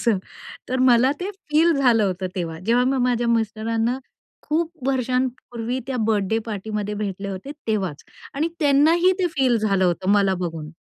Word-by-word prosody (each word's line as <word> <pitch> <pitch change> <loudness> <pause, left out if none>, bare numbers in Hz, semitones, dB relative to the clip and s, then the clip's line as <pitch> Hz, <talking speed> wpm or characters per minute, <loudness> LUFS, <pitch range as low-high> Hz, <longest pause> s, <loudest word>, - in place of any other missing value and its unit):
असं 230 -5 +2 0.5
तर 260 +1 -1
मला 255 0 +5
ते 385 +3 -3 0.2
फील 320 +3 +4
झालं 245 -7 +3
होतं 185 0 -2
तेव्हा. 165 -3 -4
जेव्हा 245 +2 +3
मी 265 +1 +1
माझ्या 240 -1 +1
मिस्टरांना 225 +2 0 0.4
खूप 320 -3 -2
वर्षांपूर्वी 250 -2 -1
त्या 265 -1 -3
बर्थडे 215 0 +1
पार्टीमध्ये 210 0 -4
भेटले 200 -1 -4
होते 195 +8 -6 0.2
तेव्हाच 190 -9 -2 0.3
आणि 310 +4 0
त्यांना 290 0 +4
ही 360 +2 +4
ते 370 - +2
फील 255 -4 +3
झालं 195 -3 +1
होतं, 180 +1 0
मला 200 -2 +3
बघून. 165 -3 -5
230 Hz, 160 wpm, -22 LUFS, 200-265 Hz, 0.5 s, मला